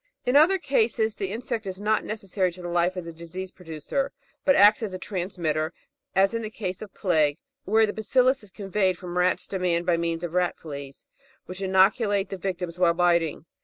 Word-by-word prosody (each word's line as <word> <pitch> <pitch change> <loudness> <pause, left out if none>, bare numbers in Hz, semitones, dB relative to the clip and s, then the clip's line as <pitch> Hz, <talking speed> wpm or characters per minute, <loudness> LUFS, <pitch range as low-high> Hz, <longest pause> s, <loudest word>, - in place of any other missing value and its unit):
In 250 - +1
other 325 +7 +6
cases, 225 - +1
the 195 -2 -4
insect 225 -1 -4
is 185 0 -5
not 215 +1 +1
necessary 195 -3 -2
to 180 - -11
the - - -4
life 175 +1 +1
of 180 -2 -5
the 170 - -7
disease 175 +3 -7
producer, 165 - -4 0.3
but 280 - +4
acts 205 +3 +6
as 210 -4 -3
a - - -3
transmitter, 170 -5 -2 0.4
as 195 +3 +4
in 230 - -1
the 215 - -4
case 190 -4 -5
of 215 -2 -8
plague, 155 -6 +2 0.3
where 220 +2 +4
the 205 - -4
bacillus 255 +4 +2
is 210 - -15
conveyed 195 -2 0
from 175 0 -7
rats 180 +1 +1
to 190 - -4
man 175 -2 +1
by 175 -1 +2
means 165 0 -2
of 175 - -3
ratfleas, 145 -6 -3 0.4
which 185 +1 -8
inoculate 195 +1 +3
the 195 - -5
victims 180 -2 -4
while 170 -2 +4
biting. 170 -3 +1
185 Hz, 200 wpm, -26 LUFS, 175-215 Hz, 0.4 s, other